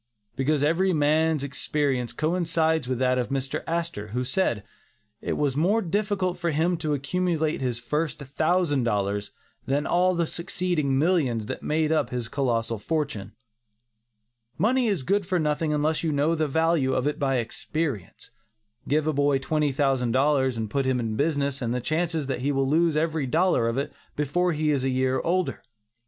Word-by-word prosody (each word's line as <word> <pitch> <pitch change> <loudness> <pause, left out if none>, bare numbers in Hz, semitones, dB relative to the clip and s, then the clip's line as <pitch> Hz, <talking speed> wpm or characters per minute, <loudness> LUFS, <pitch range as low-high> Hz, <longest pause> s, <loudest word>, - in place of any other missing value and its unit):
Because 145 +2 +1
every 180 +5 +2
man's 155 0 +2
experience 140 -3 -1
coincides 160 -2 0
with 130 -1 -1
that 130 0 +2
of 125 -1 -2
Mr. 135 +2 -2
Astor, 165 -11 -2
who 125 +4 -2
said, 125 - 0 0.6
'it - - -2
was 145 -3 0
more 185 +9 +3
difficult 190 -1 -1
for 170 -1 0
him 165 +3 +1
to 155 -2 -1
accumulate 160 +2 -1
his 125 -3 -1
first 150 +5 -2
thousand 150 +1 0
dollars, 100 -2 -1 0.4
than 140 +2 0
all 180 +1 +2
the 170 0 +1
succeeding 170 -5 -1
millions 140 - +1
that - - -5
made 155 0 0
up 160 - +1
his 120 -2 -3
colossal 115 -5 -1
fortune.' 110 -8 -3 1.2
Money 240 +7 +2
is 195 -10 0
good 200 +6 +1
for 185 0 0
nothing 150 0 0
unless 150 +1 +1
you 160 - +1
know 145 +3 +2
the 155 -2 0
value 160 -2 +2
of 130 - 0
it 150 +2 -1
by 135 -2 +1
experience. 125 - -4 0.6
Give 150 +2 +1
a 155 - +1
boy 145 0 +2
twenty 150 +2 0
thousand 130 -3 +1
dollars 130 -2 +2
and 110 -1 -2
put 135 +5 -1
him 130 -1 +1
in 110 -2 -2
business 140 -1 0
and 120 0 -1
the - - 0
chances 160 +4 -1
are - - -7
that 130 - -1
he 140 +3 +1
will 135 -1 +1
lose 160 +2 +2
every 160 -3 0
dollar 160 -4 +2
of 115 - -2
it 140 - -2 0.2
before 175 +5 +1
he 155 -1 +1
is 140 -3 0
a 135 - +1
year 130 0 +1
older. 180 +4 -1
150 Hz, 180 wpm, -26 LUFS, 130-165 Hz, 1.2 s, more